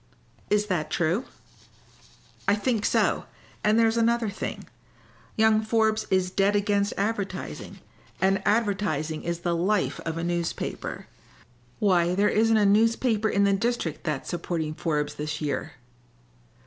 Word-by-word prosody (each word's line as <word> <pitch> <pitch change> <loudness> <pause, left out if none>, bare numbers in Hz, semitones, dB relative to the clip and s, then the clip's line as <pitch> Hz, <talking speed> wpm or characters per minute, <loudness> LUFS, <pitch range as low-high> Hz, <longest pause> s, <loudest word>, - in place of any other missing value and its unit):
"Is 210 0 +2
that 170 -7 -2
true?" 175 - 0 1.2
"I 200 - +5
think 215 0 0
so. - - +1 0.4
And 210 +1 +3
there's 225 0 +3
another 230 -1 +2
thing. - - -5 0.7
Young 220 0 +4
Forbes 220 0 +1
is 185 -1 +1
dead 200 +2 +2
against 205 -1 +1
advertising, 200 -2 -3 0.4
and 190 0 +2
advertising 195 -9 0
is 170 0 -3
the 175 -1 0
life 185 +4 0
of 165 0 -4
a 165 - -3
newspaper. 170 -1 -3 0.7
Why, 180 -3 +2
there 205 +2 +3
isn't 225 +1 +3
a 215 +2 +4
paper 220 -4 +1
in 200 0 +2
the 200 0 +3
district 200 -6 -1
that's 150 -5 -3
supporting 170 -3 -3
Forbes 150 -2 -1
this 150 0 -4
year." 150 -2 -3
200 Hz, 135 wpm, -26 LUFS, 170-220 Hz, 1.2 s, I